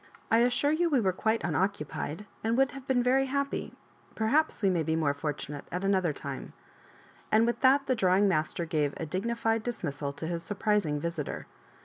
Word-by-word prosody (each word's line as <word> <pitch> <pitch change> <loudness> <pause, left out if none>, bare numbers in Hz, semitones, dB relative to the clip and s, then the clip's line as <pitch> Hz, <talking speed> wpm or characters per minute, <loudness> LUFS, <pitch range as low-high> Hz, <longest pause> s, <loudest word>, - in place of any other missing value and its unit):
I 225 +1 +5
as 245 +1 +4
sure 285 +4 +2
you 335 +2 +2
we 280 -5 +3
were 190 -5 +1
quite 220 +4 0
unoccupied, 175 0 -2 0.2
and 225 +2 +1
would 270 +1 +3
have 275 0 -10
been 250 -2 +2
very 265 +2 +3
happy 280 +1 -2 0.2
— - - -30
perhaps 265 +4 +1
we 195 - +5
may 175 -2 +1
be 160 0 0
more 155 -3 +1
fortunate 145 -1 -4
at 180 +2 -3
another 190 -4 +2
time;" 140 -2 -7 0.8
and 220 +1 +5
with 235 - 0
that 275 +1 +5
the 265 - +2
drawings 195 -3 +3
master 165 -1 0
gave 150 -3 0
a 165 - -3
dignified 225 +6 -1
dismissal 155 - -3
to 160 - -6
bis 170 0 -3
surprising 205 -5 0
visitor. 165 -2 -4
200 Hz, 195 wpm, -29 LUFS, 160-245 Hz, 0.8 s, I